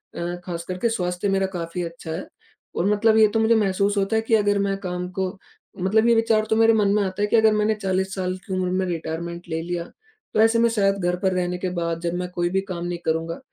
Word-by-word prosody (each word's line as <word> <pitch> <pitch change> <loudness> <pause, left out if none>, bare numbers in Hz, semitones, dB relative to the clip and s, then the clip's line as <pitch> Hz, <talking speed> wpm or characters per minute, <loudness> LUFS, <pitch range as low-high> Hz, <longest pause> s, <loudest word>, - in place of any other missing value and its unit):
अ, 175 +1 -3
ख़ासकर 175 +1 -5
के 230 +6 +1
स्वास्थ्य 180 -2 -1
मेरा 195 0 +2
काफ़ी 170 +1 -4
अच्छा 165 -1 -7
है 165 +4 -5 0.5
और 175 - 0
मतलब 220 +1 +3
ये 220 - +7
तो 225 - +2
मुझे 225 +1 +4
महसूस 200 0 +1
होता 195 +3 +1
है 220 - +3
कि 225 0 +2
अगर 205 -1 +2
मैं 200 0 0
काम 180 0 -3
को 190 +1 -2 0.5
मतलब 220 +4 +3
ये 235 - +5
विचार 225 -1 +2
तो 220 - +3
मेरे 225 0 +5
मन 210 -2 +3
में 210 - +2
आता 190 +1 -3
है 205 - +2
कि 220 - +1
अगर 220 -1 +5
मैंने 215 +1 +2
40 190 -2 -1
साल 185 -1 -2
की 190 - -5
उम्र 185 -1 0
में 185 +1 0
रिटायरमेंट 170 0 -5
ले 160 0 -2
लिया 175 0 -3 0.5
तो - - +1
ऐसे 225 +1 +4
में 235 0 +4
शायद 200 -3 +2
घर 180 - +1
पर 190 0 +1
रहने 180 0 -1
के 185 +1 -2
बाद 170 -1 -2
जब 170 0 -2
मैं 180 0 -3
कोई 175 0 -1
भी 190 +1 0
काम 175 -1 -4
नहीं 175 -1 -3
करूँगा 165 +1 -1
190 Hz, 255 wpm, -23 LUFS, 175-215 Hz, 0.5 s, ये